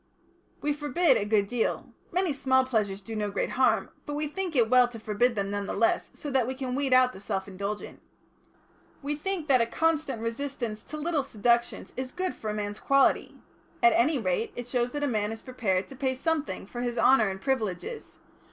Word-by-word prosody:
"We 295 Hz, 0 st, +1 dB
forbid 300 Hz, +3 st, +3 dB
a 205 Hz, -, -1 dB
good 205 Hz, -1 st, +3 dB
deal. 235 Hz, +2 st, -2 dB, 0.2 s
Many 365 Hz, -3 st, +1 dB
small 260 Hz, -1 st, +2 dB
pleasures 210 Hz, -6 st, -1 dB
do 220 Hz, +3 st, -7 dB
no 210 Hz, -1 st, -1 dB
great 200 Hz, -, -2 dB
harm, 260 Hz, 0 st, +2 dB, 0.2 s
but 290 Hz, -, -3 dB
we 300 Hz, +1 st, -1 dB
think 355 Hz, +1 st, -4 dB
it 235 Hz, -4 st, +4 dB
well 250 Hz, +1 st, +6 dB
to 240 Hz, -1 st, -9 dB
forbid 225 Hz, +3 st, +1 dB
them, 200 Hz, -1 st, -2 dB
none 205 Hz, -1 st, -2 dB
the -, -, -3 dB
less, 345 Hz, 0 st, +2 dB
so 290 Hz, -, -6 dB
that 260 Hz, -3 st, +2 dB
we 260 Hz, -, -3 dB
can 260 Hz, -1 st, -4 dB
weed 275 Hz, 0 st, 0 dB
out 255 Hz, 0 st, +5 dB
the 190 Hz, -, -11 dB
self 190 Hz, -1 st, -3 dB
indulgent. 200 Hz, +2 st, -5 dB, 1.0 s
We 290 Hz, +1 st, -1 dB
think 340 Hz, +1 st, -3 dB
that 260 Hz, -4 st, +5 dB
a 230 Hz, -, +2 dB
constant 315 Hz, -3 st, 0 dB
resistance 230 Hz, -2 st, -3 dB
to 305 Hz, -, -7 dB
little 310 Hz, 0 st, 0 dB
seductions 235 Hz, -2 st, 0 dB
is 260 Hz, 0 st, -4 dB
good 370 Hz, +3 st, -2 dB
for 215 Hz, -, -6 dB
a -, -, -1 dB
man's 205 Hz, 0 st, -4 dB
quality. 275 Hz, -1 st, +2 dB, 0.4 s
At 235 Hz, -1 st, +7 dB
any 285 Hz, +6 st, +3 dB
rate, 200 Hz, -1 st, -1 dB
it 245 Hz, 0 st, -6 dB
shows 245 Hz, -1 st, 0 dB
that 290 Hz, 0 st, -2 dB
a -, -, +2 dB
man 215 Hz, -4 st, 0 dB
is 225 Hz, -, -7 dB
prepared 195 Hz, -7 st, -1 dB
to 270 Hz, -, -9 dB
pay 260 Hz, 0 st, -1 dB
something 310 Hz, -, -2 dB
for 240 Hz, +4 st, -6 dB
his 245 Hz, -1 st, -2 dB
honour 250 Hz, -6 st, +5 dB
and 190 Hz, 0 st, -5 dB
privileges. 260 Hz, -, -3 dB
250 Hz, 210 wpm, -28 LUFS, 215-285 Hz, 1.0 s, At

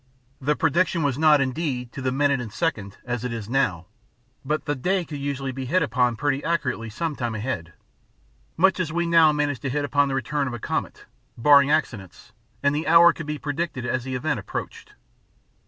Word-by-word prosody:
The 150 Hz, +3 st, +1 dB
prediction 170 Hz, +2 st, +1 dB
was 140 Hz, -1 st, 0 dB
not, 155 Hz, -2 st, +5 dB
indeed, 130 Hz, -3 st, -2 dB
to 135 Hz, -, -7 dB
the 130 Hz, 0 st, 0 dB
minute 140 Hz, 0 st, +1 dB
and 115 Hz, -3 st, -7 dB
second, 105 Hz, -, -3 dB
as 120 Hz, -1 st, -3 dB
it 125 Hz, -, -3 dB
is 115 Hz, -3 st, -5 dB
now; 110 Hz, -9 st, 0 dB, 0.6 s
but 150 Hz, +3 st, -2 dB
the 145 Hz, -, 0 dB
day 180 Hz, +6 st, -1 dB
could 150 Hz, -3 st, -7 dB
usually 140 Hz, -1 st, -3 dB
be 130 Hz, 0 st, -5 dB
hit 185 Hz, +8 st, +2 dB
upon 125 Hz, 0 st, +1 dB
pretty 140 Hz, +2 st, -1 dB
accurately 140 Hz, -9 st, -1 dB
some 155 Hz, +8 st, -3 dB
time 120 Hz, -4 st, -3 dB
ahead, 105 Hz, -8 st, -4 dB, 0.8 s
much 190 Hz, +3 st, +3 dB
as 170 Hz, -4 st, -1 dB
we 170 Hz, +1 st, 0 dB
now 165 Hz, -2 st, +5 dB
manage 145 Hz, -3 st, -1 dB
to 135 Hz, -, -3 dB
hit 145 Hz, +2 st, -1 dB
upon 145 Hz, +1 st, +2 dB
the 135 Hz, -, -2 dB
return 140 Hz, +2 st, -1 dB
of 120 Hz, -, -4 dB
a -, -, -7 dB
comet -, -, -4 dB, 0.3 s
barring 140 Hz, +3 st, +6 dB
accidents; 115 Hz, -, -2 dB, 0.3 s
and 140 Hz, 0 st, +3 dB
the 155 Hz, -, -2 dB
hour 170 Hz, +1 st, +7 dB
could 165 Hz, -, -8 dB
be 150 Hz, 0 st, -3 dB
predicted 145 Hz, -3 st, -3 dB
as 120 Hz, 0 st, -1 dB
the 130 Hz, 0 st, -4 dB
event 145 Hz, 0 st, -1 dB
approached. 100 Hz, -, -7 dB
140 Hz, 200 wpm, -24 LUFS, 125-155 Hz, 0.8 s, hour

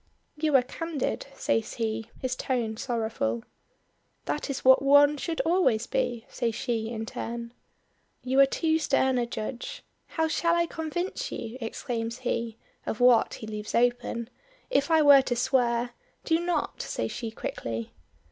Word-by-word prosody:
"You 300 Hz, -1 st, +1 dB
are 260 Hz, -, +6 dB
candid,'" 310 Hz, +2 st, -3 dB
says 225 Hz, -4 st, -1 dB
he, 225 Hz, -1 st, -2 dB
his 255 Hz, -1 st, -2 dB
tone 240 Hz, -4 st, -1 dB
sorrowful. 235 Hz, +1 st, -2 dB, 0.8 s
"That 295 Hz, -, -2 dB
is 275 Hz, -1 st, -4 dB
what 260 Hz, 0 st, +7 dB
one 285 Hz, +1 st, +6 dB
should 325 Hz, +3 st, -2 dB
always 310 Hz, -10 st, +2 dB
be," 235 Hz, -1 st, -1 dB
says 230 Hz, -2 st, -2 dB
she 230 Hz, -3 st, -2 dB
in 225 Hz, -1 st, -4 dB
turn. 235 Hz, +1 st, -5 dB, 0.7 s
"You 260 Hz, +1 st, +1 dB
are 275 Hz, -, +8 dB
too 320 Hz, +3 st, +1 dB
stern 265 Hz, -4 st, +2 dB
a 240 Hz, -, 0 dB
judge. 245 Hz, -, -5 dB, 0.2 s
How 320 Hz, -1 st, 0 dB
shall 335 Hz, +2 st, +2 dB
I 340 Hz, 0 st, +3 dB
convince 345 Hz, +9 st, -3 dB
you," 225 Hz, +2 st, -5 dB
exclaims 230 Hz, 0 st, -3 dB
he 230 Hz, -2 st, -1 dB, 0.3 s
"of 215 Hz, -, -4 dB
what 245 Hz, -2 st, +5 dB
he -, -, -8 dB
leaves 215 Hz, -1 st, -5 dB
open? 240 Hz, 0 st, +1 dB, 0.4 s
If 285 Hz, -, +2 dB
I 320 Hz, -1 st, +5 dB
were 285 Hz, -2 st, +9 dB
to 255 Hz, -2 st, -2 dB
swear 240 Hz, -1 st, +1 dB, 0.2 s
" -, -, -37 dB
"Do 325 Hz, 0 st, +3 dB
not," 345 Hz, 0 st, -1 dB
says -, -, -3 dB
she 230 Hz, -, -4 dB
quickly. 115 Hz, -, -5 dB
250 Hz, 155 wpm, -27 LUFS, 230-295 Hz, 0.8 s, were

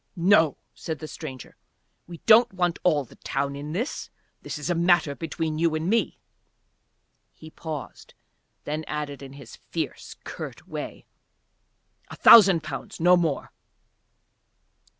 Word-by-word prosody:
"No," 170 Hz, -5 st, +4 dB, 0.2 s
said 160 Hz, -1 st, -5 dB
the 155 Hz, -, -8 dB
stranger. 135 Hz, -6 st, -9 dB, 0.5 s
"We 170 Hz, -2 st, -10 dB
don't 230 Hz, +2 st, +6 dB
want 175 Hz, -2 st, 0 dB
all 150 Hz, -6 st, +2 dB
the -, -, -18 dB
town 140 Hz, +1 st, -3 dB
in 145 Hz, +2 st, -6 dB
this. 230 Hz, -, -4 dB, 0.3 s
This -, -, -6 dB
is 150 Hz, -, -5 dB
a 175 Hz, -, +1 dB
matter 170 Hz, -3 st, +3 dB
between 160 Hz, 0 st, -4 dB
you 165 Hz, -1 st, +2 dB
and 155 Hz, +2 st, -2 dB
me." 230 Hz, +4 st, +1 dB, 1.1 s
He 160 Hz, 0 st, -14 dB
paused, 155 Hz, -4 st, -8 dB, 0.5 s
then 155 Hz, +2 st, -3 dB
added 145 Hz, -2 st, -5 dB
in 135 Hz, -1 st, -10 dB
his 140 Hz, 0 st, -12 dB
fierce, -, -, -5 dB
curt -, -, -8 dB
way: -, -, -7 dB, 1.0 s
"A -, -, -10 dB
thousand 195 Hz, -7 st, +8 dB
pounds, -, -, -7 dB
no 175 Hz, +2 st, +6 dB
more." 165 Hz, -5 st, -1 dB
160 Hz, 135 wpm, -25 LUFS, 150-175 Hz, 1.1 s, thousand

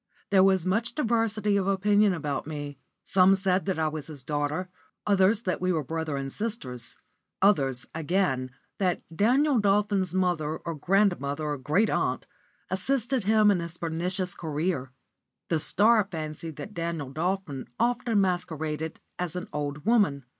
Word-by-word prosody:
There 190 Hz, -2 st, +6 dB
was 190 Hz, -2 st, +3 dB
much 220 Hz, +6 st, 0 dB
diversity 225 Hz, -6 st, +1 dB
of 195 Hz, -1 st, 0 dB
opinion 205 Hz, +1 st, +3 dB
about 145 Hz, -5 st, -3 dB
me. 145 Hz, -3 st, -6 dB, 0.2 s
Some 190 Hz, 0 st, +5 dB
said 190 Hz, -1 st, +1 dB
that 190 Hz, -3 st, -1 dB
I 160 Hz, -1 st, +1 dB
was 155 Hz, -2 st, -4 dB
his 145 Hz, -5 st, -9 dB
daughter; 145 Hz, +5 st, -2 dB, 0.4 s
others 200 Hz, +2 st, +3 dB
that 185 Hz, -, -2 dB
we 185 Hz, 0 st, +1 dB
were 160 Hz, -4 st, 0 dB
brother 160 Hz, 0 st, -3 dB
and 135 Hz, 0 st, -4 dB
sister; 215 Hz, -, -3 dB, 0.6 s
others, 135 Hz, -11 st, +2 dB
again, 160 Hz, -6 st, 0 dB, 0.3 s
that 185 Hz, -3 st, 0 dB
Daniel 260 Hz, -, +3 dB
Dolphin's 200 Hz, -3 st, +1 dB
mother 170 Hz, -4 st, 0 dB
or 170 Hz, -, -5 dB
grandmother 160 Hz, -4 st, +1 dB
or 150 Hz, -1 st, -2 dB
great 155 Hz, +12 st, +2 dB
aunt -, -, 0 dB, 0.5 s
assisted 245 Hz, +3 st, +1 dB
him 215 Hz, 0 st, +5 dB
in 190 Hz, -, +1 dB
his 170 Hz, 0 st, -4 dB
pernicious 180 Hz, +3 st, -2 dB
career. 155 Hz, -3 st, -2 dB, 0.6 s
The 165 Hz, -, +2 dB
Star 215 Hz, +7 st, +4 dB
fancied 155 Hz, -1 st, -6 dB
that 210 Hz, -, -8 dB
Daniel 165 Hz, -6 st, -3 dB
Dolphin 165 Hz, -3 st, -2 dB
often 240 Hz, -2 st, +1 dB
masqueraded 160 Hz, -4 st, -2 dB, 0.2 s
as 180 Hz, -2 st, -3 dB
an 180 Hz, -, -4 dB
old 145 Hz, +1 st, -4 dB
woman. 200 Hz, -, +2 dB
180 Hz, 150 wpm, -27 LUFS, 155-205 Hz, 0.6 s, There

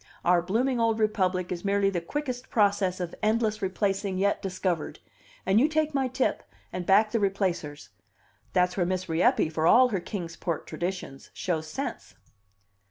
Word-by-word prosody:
Our 175 Hz, 0 st, +4 dB
blooming 235 Hz, +8 st, 0 dB
old 225 Hz, -1 st, +2 dB
republic 185 Hz, -4 st, 0 dB
is 175 Hz, -1 st, -4 dB
merely 200 Hz, 0 st, +2 dB
the 175 Hz, -3 st, -2 dB
quickest 255 Hz, -, -4 dB
process 200 Hz, -4 st, +2 dB
of 175 Hz, -2 st, -4 dB
endless 215 Hz, 0 st, +1 dB
replacing 195 Hz, 0 st, -1 dB
yet 200 Hz, +2 st, +1 dB
discovered, 180 Hz, -3 st, -2 dB, 0.5 s
and 195 Hz, +3 st, +4 dB
you 280 Hz, -, +5 dB
take 310 Hz, -1 st, 0 dB
my 270 Hz, -2 st, +1 dB
tip, 255 Hz, +1 st, 0 dB, 0.3 s
and 180 Hz, -1 st, -4 dB
back 210 Hz, +2 st, +5 dB
the 230 Hz, -, +1 dB
replacers! 185 Hz, -7 st, -2 dB, 0.6 s
That's 180 Hz, -1 st, +2 dB
where 180 Hz, -, +1 dB
Miss 185 Hz, 0 st, -2 dB
Rieppe, 165 Hz, -1 st, +3 dB
for 160 Hz, 0 st, 0 dB
all 250 Hz, +6 st, +6 dB
her 200 Hz, -5 st, -1 dB
Kings 170 Hz, -3 st, -6 dB
Port 170 Hz, -3 st, -3 dB
traditions, 175 Hz, -6 st, -5 dB
shows 160 Hz, -4 st, -2 dB
sense." 155 Hz, -, -5 dB
195 Hz, 165 wpm, -27 LUFS, 180-220 Hz, 0.6 s, all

